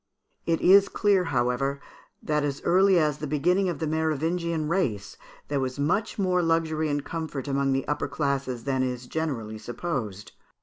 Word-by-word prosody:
It 165 -1 +1
is 195 +2 +6
clear, 200 -3 +2
however, 135 0 0 0.4
that 150 -1 0
as 140 -1 -2
early 190 +1 +4
as 150 -3 +1
the 150 - -4
beginning 180 +7 +2
of 170 - -3
the 160 - -2
Merovingian 160 +1 -1
race, 135 - -1 0.3
there 145 -1 -1
was 130 0 -3
much 180 +10 0
more 185 -3 +2
luxury 160 -2 +1
and 145 -1 -2
comfort 160 -4 -5
among 140 0 +1
the 135 0 -1
upper 150 - -1
classes 140 -5 -2
than 135 -2 0
is 125 -1 -2
generally 125 -8 -3
supposed. 110 - -4
150 Hz, 165 wpm, -26 LUFS, 135-170 Hz, 0.4 s, is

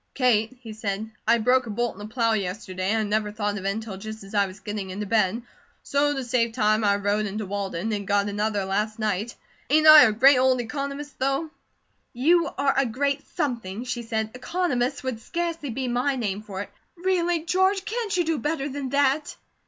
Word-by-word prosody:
"Kate," 250 -2 +2
he 220 -2 -7
said, 215 0 -4 0.2
"I 235 - +5
broke 250 +2 +2
a - - -6
bolt 240 +3 -1
in - - -15
the 205 - -7
plow 230 -2 +2
yesterday, 185 -2 -3
and 220 +1 +2
I - - 0
never 210 0 -1
thought 205 -1 -2
of 190 - -9
it - - +2
until 215 -1 -4
just 220 +1 -8
as 195 - -12
I 200 -1 +3
was 190 +2 -11
getting 205 -2 -5
into 200 +3 -4
bed, 215 +2 +1 0.4
so 290 0 +1
to 270 - -3
save 235 -2 0
time 215 0 +2
I 200 -1 +3
rode 205 +1 0
in 200 +1 -5
to 215 - -3
Walden 200 +1 -3
and 200 -1 -3
got 200 0 +2
another 205 -1 -1
last 210 +3 -1
night. 215 +1 -2 0.3
Ain't 310 +2 +4
I 310 -1 +11
a 220 - +3
great 255 +5 +6
old 260 0 +3
economist, 280 +4 -5
though?" 275 +4 0 0.6
"You 325 +7 +3
are 275 0 +2
a 270 -1 +2
great 280 +4 -1
something," 235 - -2
she 245 -1 -3
said. 220 -1 -2
"'Economist' 255 -3 -1
would 260 -4 -3
scarcely 335 -2 -3
be 255 +2 -3
my 250 +3 0
name 210 -5 -2
for 200 -3 -6
it. - - -8 0.3
Really, 350 -2 0
George, 375 +2 +2
can't 445 -4 -2
you 350 - +3
do 320 -3 -1
better 295 -2 -2
than 275 -1 -4
that?" 280 +2 +1
230 Hz, 210 wpm, -25 LUFS, 210-280 Hz, 0.6 s, I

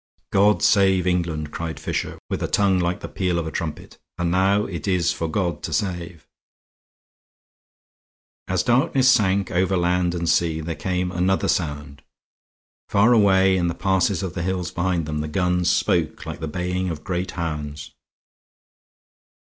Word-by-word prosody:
"God 105 +2 +3
save 95 -4 +4
England!" 85 -4 -1
cried 85 -1 -5
Fisher, - - -3
with - - -3
a - - -1
tongue 100 -2 +2
like 90 0 -1
the - - -5
peal 90 -3 -1
of 85 - -2
a 80 - -4
trumpet. 80 -3 -6 0.2
"And 90 -1 -1
now 100 +3 +2
it 85 0 -6
is 90 -2 +2
for 80 - -3
God 85 -2 -2
to - - -5
save." 85 -1 -3 2.2
As - - 0
darkness 130 +1 +3
sank 100 -4 +2
again 90 - +2
over 95 0 +1
land 90 0 +1
and 85 -1 -2
sea, 80 -1 +2
there 80 +1 -4
came 90 +3 -2
another 95 +2 +1
sound; 75 -4 -2 0.9
far 105 +5 +4
away 95 -3 +4
in 90 -2 +1
the 85 - -2
passes 95 -1 +1
of 90 -2 -4
the 90 - -4
hills 90 -1 -2
behind 90 -2 -1
them 75 0 -3
the 75 - -3
guns 90 +2 +1
spoke - - 0
like - - -6
the 80 - -4
baying 90 +3 -2
of 80 -3 -6
great 90 0 -3
hounds. 75 -3 -5
90 Hz, 165 wpm, -23 LUFS, 85-95 Hz, 2.2 s, save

